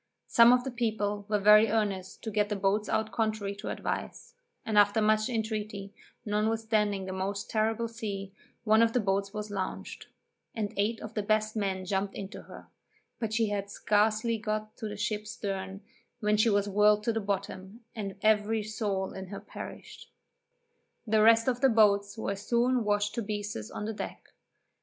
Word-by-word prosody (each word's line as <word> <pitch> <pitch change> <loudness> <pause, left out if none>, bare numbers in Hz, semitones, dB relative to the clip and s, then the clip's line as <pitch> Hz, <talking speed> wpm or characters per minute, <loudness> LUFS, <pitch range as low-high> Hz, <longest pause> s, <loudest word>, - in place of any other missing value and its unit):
Some 235 +1 +7
of 250 0 +4
the 265 - -4
people 210 -4 -2
were 210 - +2
very 210 +2 +7
earnest 200 -4 -2
to 220 - -4
get 210 0 +1
the 210 - -1
boats 200 +2 0
out 220 0 0
contrary 215 -1 -1
to - - -6
advice; - - -4 0.3
and, 220 - -2
after 205 +1 +5
much 215 +1 +2
intreaty, 215 -3 -3 0.3
notwithstanding 210 -2 0
a 190 - -4
most 195 +1 -3
terrible 225 +1 +1
sea, 200 -4 -6 0.3
one 220 0 +5
of 230 0 +3
the 250 - +3
boats 195 -1 0
was 210 0 -5
launched, 190 -2 -5 0.5
and 215 -2 -2
eight 215 +3 0
of 215 - -7
the 215 - -1
best 215 +1 0
men 190 -3 -2
jumped 195 +1 -1
into 200 +1 -7
her, - - -12 0.5
but 225 -2 -2
she 220 -1 +1
had 200 -1 -3
scarcely 215 +3 +1
got 215 0 -3
to 220 - -4
the 210 0 -6
ship's 210 +1 -3
stern, 195 -3 -4 0.4
when 210 -2 +2
she 215 +2 +4
was 205 -1 +2
whirled 210 +1 +4
to 230 - +1
the 225 - -1
bottom, 195 +1 -4
and 200 -3 -4
every 215 0 +3
soul 205 -3 -2
in 190 0 -7
her 200 +1 -7
perished. - - -10 1.0
The 220 -1 +3
rest 230 +2 +6
of 245 -1 0
the 270 - +6
boats 205 -2 +3
were 200 -2 -2
soon 240 +4 +1
washed 205 0 0
to 235 - -2
pieces 205 - -4
on 210 - -5
the 220 - -3
deck. - - -7
210 Hz, 180 wpm, -29 LUFS, 200-220 Hz, 1.0 s, Some